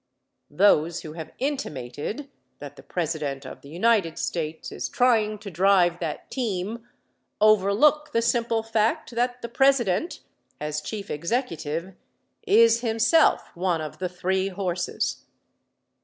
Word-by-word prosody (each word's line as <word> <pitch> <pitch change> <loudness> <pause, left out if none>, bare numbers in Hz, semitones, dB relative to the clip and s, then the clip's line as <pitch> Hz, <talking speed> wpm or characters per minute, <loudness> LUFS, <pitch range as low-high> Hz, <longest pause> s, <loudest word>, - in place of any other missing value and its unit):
Those 170 0 +3
who 155 - -8
have 160 -1 -8
intimated 235 - -4 0.3
that - - -9
the - - -13
President 150 -5 -3
of 130 - -9
the 140 - -13
United 185 0 +1
States 160 -2 -3
is - - -4
trying 220 -4 +2
to 200 -1 -9
drive 180 -1 +3
that 160 -4 -5
team, 225 -1 -3 0.5
overlook 215 +9 +4
the 230 - +1
simple 235 -1 +1
fact 225 +1 0
that 245 +1 -1
the - - -2
President, 270 - +2 0.4
as 150 0 -3
Chief 200 +4 -6
Executive, 170 - -2 0.5
is 230 - +5
himself 230 +7 +2
one 175 -1 0
of 155 -1 -7
the 185 -1 -2
three 185 +2 -1
horses. 180 -2 -3
195 Hz, 125 wpm, -25 LUFS, 165-235 Hz, 0.5 s, is